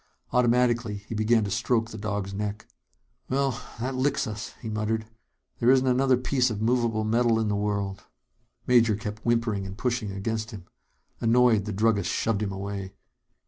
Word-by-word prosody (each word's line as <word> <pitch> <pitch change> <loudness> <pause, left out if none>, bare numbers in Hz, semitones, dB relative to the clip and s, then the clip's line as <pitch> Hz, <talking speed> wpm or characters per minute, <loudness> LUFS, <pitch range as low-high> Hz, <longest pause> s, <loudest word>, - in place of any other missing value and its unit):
Automatically, 120 -2 +2
he - - -5
began 110 +1 +3
to 100 - -3
stroke 115 +2 0
the 110 - -7
dog's 100 -2 -3
neck. 105 +1 -4 0.6
"Well, 135 -1 0 0.2
that 130 +3 -2
licks 135 +2 +1
us," 110 0 -6
he 115 - -7
muttered. 110 0 -1 0.5
"There 120 - +3
isn't 130 0 +5
another 130 0 +3
piece 125 0 +1
of 110 -3 -4
movable 115 -1 +1
metal 115 +1 +2
in 110 -1 0
the 105 - +1
world." 100 -2 -2 0.6
Major 115 -3 +4
kept 105 0 -6
whimpering 115 -4 +1
and 95 +1 -7
pushing 120 -4 -1
against 110 +3 -3
him. 100 -7 -9 0.5
Annoyed, 115 -3 +4
the 110 - -3
druggist 105 -1 +1
shoved 110 -2 0
him 105 -2 -1
away. 100 0 -5
110 Hz, 165 wpm, -26 LUFS, 105-120 Hz, 0.6 s, isn't